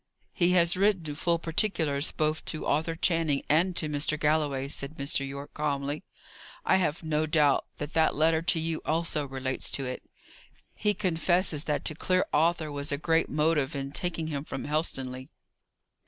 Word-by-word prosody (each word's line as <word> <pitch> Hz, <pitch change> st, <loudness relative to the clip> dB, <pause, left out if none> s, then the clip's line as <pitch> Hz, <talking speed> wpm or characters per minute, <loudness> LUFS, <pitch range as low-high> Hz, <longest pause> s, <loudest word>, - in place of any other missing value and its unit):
"He 180 Hz, 0 st, +3 dB
has 170 Hz, +1 st, +4 dB
written 185 Hz, -6 st, +1 dB
full 170 Hz, +3 st, +1 dB
particulars 160 Hz, -4 st, 0 dB
both 155 Hz, 0 st, -1 dB
to 155 Hz, -, -2 dB
Arthur 160 Hz, +3 st, 0 dB
Channing 165 Hz, -4 st, +1 dB
and 170 Hz, +4 st, +2 dB
to 160 Hz, -, 0 dB
Mr. 150 Hz, +1 st, -1 dB
Galloway," 150 Hz, -3 st, +1 dB
said 140 Hz, +1 st, -5 dB
Mr. 140 Hz, -1 st, 0 dB
Yorke, 140 Hz, +1 st, -8 dB
calmly. 145 Hz, 0 st, -2 dB, 0.6 s
"I -, -, +4 dB
have 170 Hz, -3 st, -1 dB
no 155 Hz, 0 st, 0 dB
doubt 150 Hz, -2 st, +3 dB
that 150 Hz, 0 st, -6 dB
that 160 Hz, 0 st, +3 dB
letter 160 Hz, +2 st, +3 dB
to 165 Hz, 0 st, +1 dB
you 160 Hz, 0 st, -2 dB
also 155 Hz, -2 st, 0 dB
relates 130 Hz, -1 st, -3 dB
to 135 Hz, -, 0 dB
it. 130 Hz, 0 st, -5 dB, 0.7 s
He 210 Hz, -1 st, 0 dB
confesses 175 Hz, -3 st, +2 dB
that 150 Hz, -1 st, -1 dB
to -, -, 0 dB
clear 185 Hz, +4 st, +1 dB
Arthur 160 Hz, 0 st, +2 dB
was 145 Hz, +1 st, -3 dB
a 140 Hz, -, 0 dB
great 165 Hz, +2 st, +1 dB
motive 150 Hz, -2 st, +1 dB
in 135 Hz, 0 st, -4 dB
taking 165 Hz, +1 st, -2 dB
him 145 Hz, -3 st, -3 dB
from 135 Hz, -, -6 dB
Helstonleigh." 135 Hz, -4 st, -2 dB
155 Hz, 170 wpm, -28 LUFS, 145-165 Hz, 0.7 s, has